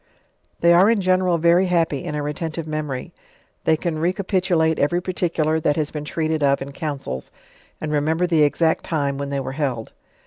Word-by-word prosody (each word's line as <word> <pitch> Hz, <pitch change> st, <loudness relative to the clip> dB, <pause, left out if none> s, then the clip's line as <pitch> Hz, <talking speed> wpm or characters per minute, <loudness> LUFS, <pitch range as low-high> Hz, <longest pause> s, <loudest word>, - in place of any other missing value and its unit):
They 170 Hz, 0 st, +6 dB
are 185 Hz, +5 st, +6 dB
in 230 Hz, -2 st, +3 dB
general 185 Hz, -2 st, +2 dB
very 170 Hz, +3 st, +4 dB
happy 165 Hz, -4 st, +1 dB
in 150 Hz, -3 st, -3 dB
a 150 Hz, -, -2 dB
retentive 155 Hz, +2 st, -4 dB
memory: 150 Hz, -4 st, -4 dB, 0.5 s
they 160 Hz, -, +3 dB
can 160 Hz, -2 st, -3 dB
recapitulate 180 Hz, -2 st, +1 dB
every 145 Hz, +5 st, +2 dB
particular 170 Hz, -3 st, 0 dB
that 150 Hz, -2 st, +1 dB
has 155 Hz, -2 st, -1 dB
been 150 Hz, -1 st, -5 dB
treated 155 Hz, 0 st, -1 dB
of 140 Hz, -1 st, +3 dB
in 140 Hz, +1 st, -6 dB
councils, 140 Hz, -, -5 dB, 0.5 s
and 155 Hz, -, -4 dB
remember 155 Hz, +4 st, +1 dB
the 165 Hz, -3 st, +2 dB
exact 160 Hz, +2 st, +2 dB
time 140 Hz, -4 st, -1 dB
when 140 Hz, 0 st, -3 dB
they 140 Hz, 0 st, -1 dB
were 135 Hz, -, -4 dB
held. 135 Hz, -6 st, -3 dB
160 Hz, 180 wpm, -22 LUFS, 145-170 Hz, 0.5 s, They